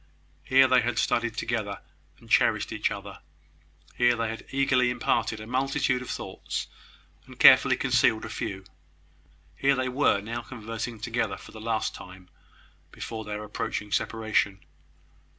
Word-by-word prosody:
Here 130 Hz, +8 st, +5 dB
they 130 Hz, -1 st, +4 dB
had 120 Hz, -1 st, -2 dB
studied 120 Hz, -1 st, 0 dB
together, 105 Hz, -4 st, -2 dB, 0.4 s
and 115 Hz, -, -18 dB
cherished 110 Hz, -1 st, +2 dB
each 110 Hz, -, 0 dB
other: 100 Hz, 0 st, -7 dB, 0.8 s
here 120 Hz, 0 st, +4 dB
they 115 Hz, -1 st, -2 dB
had 115 Hz, -, -7 dB
eagerly 130 Hz, -2 st, +2 dB
imparted 120 Hz, -2 st, 0 dB
a 110 Hz, -, -8 dB
multitude 130 Hz, +1 st, 0 dB
of 125 Hz, -, -8 dB
thoughts, -, -, -4 dB, 0.6 s
and -, -, -13 dB
carefully -, -, +8 dB
concealed 110 Hz, 0 st, +2 dB
a -, -, -7 dB
few. 95 Hz, -3 st, -5 dB, 0.9 s
Here 140 Hz, 0 st, +2 dB
they 130 Hz, -1 st, -1 dB
were 125 Hz, -5 st, +2 dB
now 115 Hz, +4 st, -5 dB
conversing 115 Hz, -1 st, -6 dB
together 115 Hz, -3 st, -2 dB
for -, -, -13 dB
the 110 Hz, -, -10 dB
last 110 Hz, -1 st, -1 dB
time 90 Hz, 0 st, -12 dB, 0.6 s
before 110 Hz, -1 st, -6 dB
their 105 Hz, 0 st, -5 dB
approaching 105 Hz, 0 st, -4 dB
separation. 105 Hz, -5 st, 0 dB
115 Hz, 145 wpm, -27 LUFS, 105-120 Hz, 0.9 s, carefully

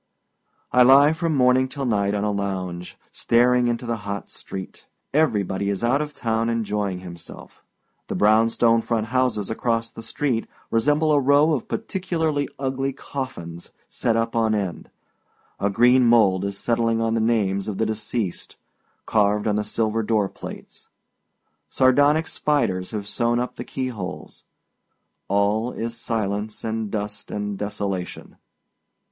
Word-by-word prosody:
I 125 Hz, -, +5 dB
lie 140 Hz, +4 st, +7 dB
from 160 Hz, -1 st, -1 dB
morning 130 Hz, 0 st, +4 dB
till 135 Hz, 0 st, -4 dB
night 100 Hz, -3 st, +1 dB
on 100 Hz, -, -1 dB
a 105 Hz, -, +1 dB
lounge, 95 Hz, -3 st, -4 dB
staring 125 Hz, +1 st, +3 dB
into 120 Hz, +1 st, -2 dB
the 115 Hz, -1 st, -2 dB
hot 100 Hz, -1 st, -6 dB
street. 95 Hz, -1 st, -9 dB, 0.3 s
Everybody 100 Hz, -, +1 dB
is 100 Hz, +2 st, -2 dB
out 130 Hz, +5 st, +2 dB
of 150 Hz, -1 st, -5 dB
town 115 Hz, 0 st, 0 dB
enjoying 105 Hz, -5 st, -2 dB
himself. 85 Hz, -2 st, -11 dB, 0.4 s
The -, -, -3 dB
brown 110 Hz, +2 st, +4 dB
stone 115 Hz, 0 st, +3 dB
front 115 Hz, -2 st, -1 dB
houses 125 Hz, -6 st, +1 dB
across 115 Hz, 0 st, -1 dB
the -, -, -9 dB
street 120 Hz, 0 st, -2 dB, 0.2 s
resemble 150 Hz, +7 st, +2 dB
a 145 Hz, -, +5 dB
row 145 Hz, +3 st, +4 dB
of 135 Hz, -, -2 dB
particularly 170 Hz, -8 st, -2 dB
ugly 135 Hz, 0 st, -2 dB
coffins 85 Hz, -14 st, -7 dB, 0.2 s
set 115 Hz, -, 0 dB
up 115 Hz, +1 st, -1 dB
on 110 Hz, -1 st, +2 dB
end. 95 Hz, -5 st, -4 dB, 0.7 s
A 100 Hz, -, +1 dB
green 125 Hz, +5 st, +5 dB
mould 100 Hz, -5 st, +4 dB
is 100 Hz, 0 st, -3 dB
settling 115 Hz, 0 st, +1 dB
on 115 Hz, 0 st, 0 dB
the 115 Hz, -, +1 dB
names 105 Hz, -4 st, +1 dB
of 105 Hz, -3 st, -3 dB
the 110 Hz, -, +1 dB
deceased, 110 Hz, -2 st, -3 dB, 0.5 s
carved 105 Hz, -1 st, +2 dB
on 105 Hz, -, +1 dB
the 105 Hz, -, 0 dB
silver 110 Hz, +1 st, -1 dB
door 110 Hz, -2 st, +1 dB
plates. -, -, -10 dB, 0.8 s
Sardonic 145 Hz, +5 st, +4 dB
spiders 95 Hz, -16 st, 0 dB
have 105 Hz, -2 st, -5 dB
sewed 120 Hz, +2 st, 0 dB
up 125 Hz, +1 st, -2 dB
the 120 Hz, -, -6 dB
key 130 Hz, +1 st, -3 dB
holes. 95 Hz, -6 st, -8 dB, 0.8 s
All 105 Hz, +4 st, +1 dB
is 115 Hz, +1 st, -4 dB
silence 105 Hz, -2 st, -3 dB
and 110 Hz, -1 st, -2 dB
dust 105 Hz, 0 st, -5 dB
and 105 Hz, -1 st, -3 dB
desolation. 100 Hz, -2 st, -4 dB
115 Hz, 150 wpm, -23 LUFS, 100-125 Hz, 0.8 s, lie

